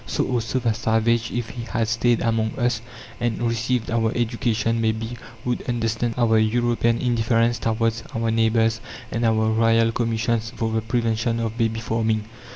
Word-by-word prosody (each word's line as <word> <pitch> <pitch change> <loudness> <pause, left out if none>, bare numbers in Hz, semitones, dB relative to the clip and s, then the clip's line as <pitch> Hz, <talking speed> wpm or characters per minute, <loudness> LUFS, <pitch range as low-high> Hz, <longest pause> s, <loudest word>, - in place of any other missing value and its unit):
So - - 0
also 120 0 -1
the 115 -3 +1
savage, 115 +1 +1
if 120 -2 -3
he 120 - -7
had 115 -1 -1
stayed 115 +1 +2
among 110 -1 0
us, 120 -2 0 0.4
and 120 -1 -1
received 115 0 -1
our 115 -1 +1
education, 115 -1 0
may 110 -1 +2
be, 115 +2 -5 0.3
would 125 -1 -1
understand 115 0 -1
our 115 -2 +4
European 115 +1 +2
indifference 115 -1 +1
towards 115 0 0
our 115 0 0
neighbours, 115 0 +2 0.3
and 115 - -1
our 110 -1 +2
Royal 115 0 +3
Commissions 115 0 -1
for 115 -1 -1
the 110 0 0
prevention 115 +1 0
of 115 -1 -2
"babyfarming." 115 -1 0
115 Hz, 160 wpm, -23 LUFS, 110-120 Hz, 0.4 s, our